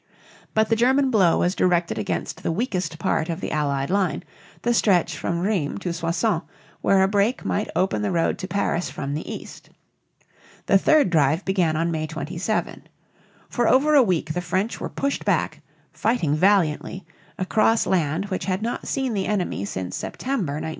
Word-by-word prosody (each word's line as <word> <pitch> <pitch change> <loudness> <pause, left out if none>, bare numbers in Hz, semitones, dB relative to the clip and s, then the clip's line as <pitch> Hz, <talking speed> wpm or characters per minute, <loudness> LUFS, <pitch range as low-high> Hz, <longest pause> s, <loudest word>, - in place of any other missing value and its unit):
But 220 0 +3
the 225 - +3
German 260 +4 +3
blow 190 -7 +4
was 180 - +1
directed 175 - +1
against 90 -5 -3
the - - -1
weakest 185 -4 -2
part 170 -2 0
of 165 +1 -3
the - - -4
Allied 140 -1 -1
line, 195 -1 0 0.4
the 240 - +2
stretch 190 -7 +2
from 170 0 -2
Rheims 185 -7 -1
to 175 -3 -2
Soissons, 170 +3 0 0.4
where 195 -1 +4
a - - +4
break 205 +5 +1
might 210 - -1
open 185 +4 +1
the 210 - 0
road 170 -2 0
to 185 - -4
Paris 195 -3 -1
from 140 +1 -4
the 150 - -4
east. - - -9 1.0
The 195 - +4
third 295 - +4
drive 155 +2 +2
began 180 -5 +1
on 165 +2 0
May 155 -1 -2
27. 165 +7 -3 0.6
For 240 - 0
over 290 +4 +4
a 290 - +8
week 175 -8 0
the 180 - -2
French 185 +6 -2
were - - -3
pushed 280 0 -2
back, - - 0 0.3
fighting 210 -10 0
valiantly, 185 0 +1 0.3
across 220 +4 +2
land 165 0 0
which 185 - -3
had 190 +2 -1
not 235 - -3
seen 265 -3 -1
the 195 -2 -1
enemy 180 - -1
since 95 -2 -4
September, 235 - -3
1914. 155 +2 -4
185 Hz, 175 wpm, -23 LUFS, 160-215 Hz, 1.0 s, a